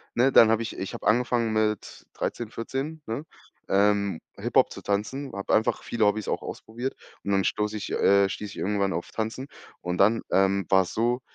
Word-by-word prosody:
ne, 130 +3 +4
dann 115 - +7
habe 115 +1 +2
ich 115 - -6
ich 95 - -5
habe - - -8
angefangen 120 0 +2
mit 110 -1 -1
13, 120 -2 -3
14, 135 +7 -4
ne, 115 +7 -4 0.4
ähm, 100 -2 +2 0.2
Hiphop - - +2
zu - - -8
tanzen, 115 +8 -2
habe 100 - -2
einfach 110 - +2
viele 115 -2 0
Hobbys 105 0 0
auch - - -1
ausprobiert 120 +4 -5 0.3
und 100 - -2
dann 95 -1 +3
stoße 105 +2 -1
ich 105 - -6
äh, 100 0 +4
stieß 105 +1 -5
ich - - -11
irgendwann 100 0 0
auf 85 - -4
Tanzen 110 +4 -3 0.4
und 90 0 -3
dann, 110 +4 +4
ähm, 95 0 +3
dann - - -23
war's 95 -2 +3
so, 120 +3 +1
110 Hz, 195 wpm, -26 LUFS, 100-115 Hz, 0.4 s, dann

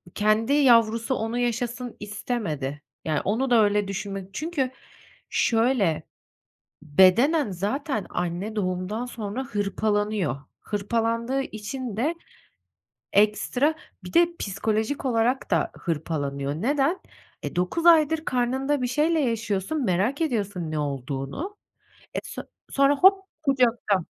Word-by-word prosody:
kendi 215 +5 +2
yavrusu 230 -3 +4
onu 225 +1 -2
yaşasın 240 0 -2
istemedi. 200 - -3 0.2
Yani, 155 -2 0
onu 240 +7 0
da 230 -3 +6
öyle 205 -1 +2
düşünmek 195 -1 -5
Çünkü 295 -2 -2 0.6
şöyle: 225 -8 +2 0.8
bedenen 195 - +4
zaten 215 - -2
anne 180 +5 -3
doğumdan 190 +3 -2
sonra 230 +1 -4
hırpalanıyor. 205 - -1 0.2
Hırpalandığı 230 +5 -1
için 220 -1 -5
de 305 +9 0 1.0
ekstra, 215 +8 +3 0.3
bir - - -9
de 340 0 +6
psikolojik 220 +7 -1
olarak 245 +1 +1
da - - +2
hırpalanıyor. 145 -4 -2
Neden? 275 - +1 0.4
E, - - -5
9 180 - -1
aydır 320 -1 +5
karnında 260 +3 0
bir 250 - 0
şeyle 305 +6 +2
yaşıyorsun, 230 +1 -1
merak 205 - +1
ediyorsun 200 - -1
ne 155 - -1
olduğunu. 140 - -4 0.6
E, - - -1
son - - -7 0.2
sonra 275 +1 +4
hop 385 +3 +5 0.2
kucakta. 240 - +2
225 Hz, 110 wpm, -25 LUFS, 195-265 Hz, 1.0 s, da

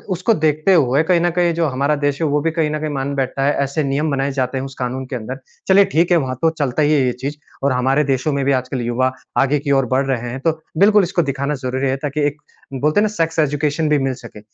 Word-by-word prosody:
उसको 185 +6 +1
देखते 155 +1 +2
हुए 140 -2 +3
कहीं 175 +1 +2
न 175 - +2
कहीं 175 0 +1
जो 165 0 0
हमारा 140 +2 0
देश 145 0 -1
है 160 - +2
वो 145 0 +1
भी 165 +2 0
कहीं 160 -2 0
न 155 - -2
कहीं 155 0 -3
मान 140 0 -2
बैठता 135 0 -1
है। 145 - +3
ऐसे 140 +3 -2
नियम 145 +2 -1
बनाए 140 0 0
जाते 130 -1 -2
हैं 130 - -3
उस 135 -1 -9
कानून 130 +1 -3
के 130 - -6
अंदर। 125 +3 -6 0.3
चलिए 195 +1 +6
ठीक 175 -1 +1
है, 175 - +6
वहाँ 130 -4 -2
तो 165 - +4
चलता 145 -3 -2
ही 150 +1 +3
है 145 - +3
ये 125 - +1
चीज़ 145 +2 -4 0.3
और 140 - +2
हमारे 130 +4 +2
देशों 135 +1 0
में 140 0 -1
भी 140 - +2
आजकल 130 -1 -1
युवा 120 +2 0 0.3
आगे 140 +2 +2
की 140 0 -2
ओर 135 -2 +3
बढ़ 135 +1 +2
रहे 125 -3 -2
हैं। 125 +3 -5
तो 165 - +4 0.3
बिल्कुल 205 +2 +5
इसको 175 0 0
दिखाना 140 +1 -2
ज़रूरी 130 +2 -1
है 130 - +1
ताकि 145 +1 -3
एक 145 +1 -5 0.3
बोलते 150 +8 +1
हैं - - +3
ना - - +3
सेक्स 165 -3 -1
एजुकेशन 150 +1 0
भी 150 - +3
मिल 135 -1 -1
सके। 110 - -11
140 Hz, 270 wpm, -19 LUFS, 135-155 Hz, 0.3 s, चलिए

